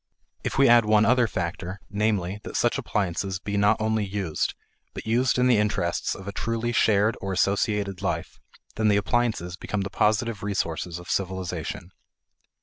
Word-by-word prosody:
If - - -3
we 135 0 +6
add 120 -1 +6
one 105 0 +4
other 125 0 +4
factor, 90 0 -4
namely, 105 -2 -1
that - - -4
such - - +2
appliances 95 -1 -1
be 100 +1 -4
not 100 +2 +3
only 110 0 +1
used, 95 -5 -2 0.4
but - - -6
used 120 +4 +2
in 125 - +3
the 125 -4 +4
interests 95 -5 0
of 100 0 -10
a - - -2
truly 115 +3 -2
shared 110 -1 +3
or 95 - -3
associated 100 0 0
life, 100 - -3 0.4
then 110 0 +2
the 105 -1 +4
appliances 105 -5 0
become 105 0 -3
the 95 - -4
positive 110 +1 +1
resources 90 -4 -2
of 90 - -11
civilization. 95 -1 -3
100 Hz, 165 wpm, -25 LUFS, 95-110 Hz, 0.4 s, we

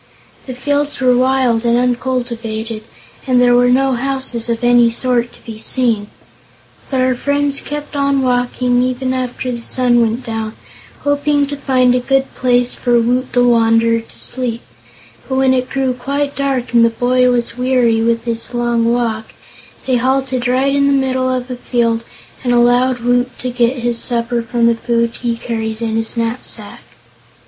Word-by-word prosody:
The 255 - -5
fields 285 +3 -1
were 250 -1 +3
wild 255 -2 +2
and 235 0 +2
uncultivated 235 -3 -2 0.4
and 250 -1 +3
there 245 0 +4
were 245 0 +4
no 265 +1 +3
houses 255 -2 -3
of 230 0 -2
any 240 -1 +5
sort 240 0 0
to - - -18
be 220 -2 -8
seen. 225 -4 0 0.8
But 265 -2 0
our 255 0 +2
friends 285 +2 -1
kept 295 0 -6
on 280 -1 +1
walking 245 0 +1
even 255 +1 -1
after 255 0 -3
the 235 -1 -5
sun 240 0 +2
went 230 +2 -1
down, 225 -1 -4 0.5
hoping 285 0 +1
to 285 +1 -5
find 255 -3 +2
a 250 - +2
good 270 +2 0
place 245 -1 +1
for 240 -1 +1
Woot 250 +2 0
the 245 - +3
Wanderer 230 -1 +3
to 225 - -14
sleep; 240 -2 -1 0.7
but 265 - -1
when 265 0 +3
it 255 0 -1
grew 265 -2 0
quite 280 +3 -3
dark 260 -3 -2
and 235 -1 +5
the 230 - +5
boy 250 +2 +2
was 240 -1 -1
weary 250 -3 +2
with 230 0 +1
his 230 +1 -3
long 235 -1 +1
walk, 225 -2 -2 0.5
they 255 -2 +2
halted 260 0 0
right 260 +2 +1
in 280 0 +3
the 280 - +3
middle 255 0 0
of 255 0 -3
a - - -3
field 235 -2 -1 0.4
and 245 - 0
allowed 245 +1 +3
Woot 245 +1 0
to 250 - -4
get 245 +1 +1
his 240 -1 -1
supper 235 0 -1
from 235 0 0
the 235 - +4
food 235 0 0
he 235 -2 -1
carried 225 -2 -4
in 225 -1 -2
his 225 +1 -2
knapsack. 230 +2 -4
245 Hz, 175 wpm, -16 LUFS, 235-260 Hz, 0.8 s, any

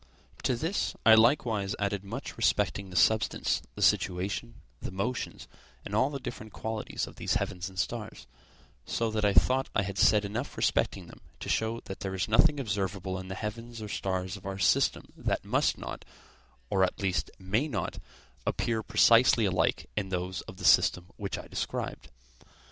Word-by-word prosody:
To 125 - +1
this 165 +11 -1
I 110 - +9
likewise 110 -4 +3
added 100 -1 -1
much 100 - -6
respecting 100 -1 +1
the 90 - -10
substance, 110 +4 +2
the - - -2
situation, 90 -9 +1 0.3
the - - -4
motions, 110 +7 -3 0.4
and 100 - -6
all 130 +6 +3
the 140 -1 -5
different 115 -4 -7
qualities 110 -1 -3
of - - -13
these - - 0
heavens 90 +1 -2
and 95 - -15
stars; 105 - -3 0.6
so 115 - -1
that 110 -1 -1
I 105 - +4
thought 130 +1 +4
I 110 - +3
had 100 0 -4
said 105 -1 +5
enough 110 +7 -4
respecting - - +1
them - - -14 0.2
to - - -5
show 110 +1 0
that 95 - -8
there 95 -1 -3
is 95 - -1
nothing 145 +7 +4
observable 95 -5 -2
in 95 - -8
the 95 - -5
heavens 115 +3 -6
or 105 -1 -6
stars 95 -1 -2
of 95 - -12
our 95 0 -4
system 95 - +2
that - - -2
must - - +2
not, - - -7 0.7
or 95 -1 +3
at 90 - 0
least 95 -3 0
may 105 +10 0
not 100 - -3 0.5
appear 115 -2 0
precisely 115 +2 +5
alike 90 -2 +1
in 100 -2 -2
those 90 -1 -2
of - - -9
the - - -6
system 90 +1 +4
which 100 -2 -3
I - - -8
described. - - -4
100 Hz, 175 wpm, -29 LUFS, 95-115 Hz, 0.7 s, I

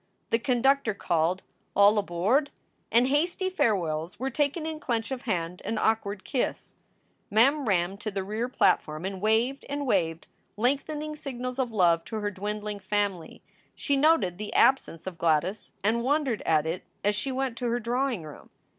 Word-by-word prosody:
The 230 - +3
conductor 250 -2 +2
called, 175 +1 0 0.3
"All 205 +2 +6
aboard!" 205 - +1 0.4
and 240 +2 +4
hasty 345 +6 +1
farewells 175 - 0
were 265 +2 -2
taken 290 +4 0
in 315 -1 -4
clench 230 -3 -2
of 260 -2 -3
hand 175 -2 -2
and 225 - -2
awkward 210 -2 0
kiss. 255 - -2 0.6
Mem 265 +6 +3
ran 190 -1 +1
to 215 +1 -4
the 195 -2 -3
rear 215 +5 -3
platform 170 -8 +1
and 190 -1 -4
waved 225 +6 +1
and 285 0 -2
waved 165 -8 0 0.3
lengthening 295 +6 -1
signals 255 -3 -5
of 250 -3 0
love 170 -5 +3
to - - -6
her 210 -1 -2
dwindling 210 +1 -4
family. 195 -3 -2 0.3
She 285 - 0
noted 270 - +3
the 210 - -5
absence 255 -11 +3
of 180 -3 -6
Gladys 170 +6 0
and 225 +3 +2
wondered 270 -2 +1
at 155 -1 +3
it 165 +3 -3 0.2
as 205 - +3
she 215 +6 -2
went 260 -2 -2
to 245 - -1
her 240 +1 0
drawing 240 -3 -1
room. 150 -2 -11
220 Hz, 165 wpm, -27 LUFS, 190-265 Hz, 0.6 s, All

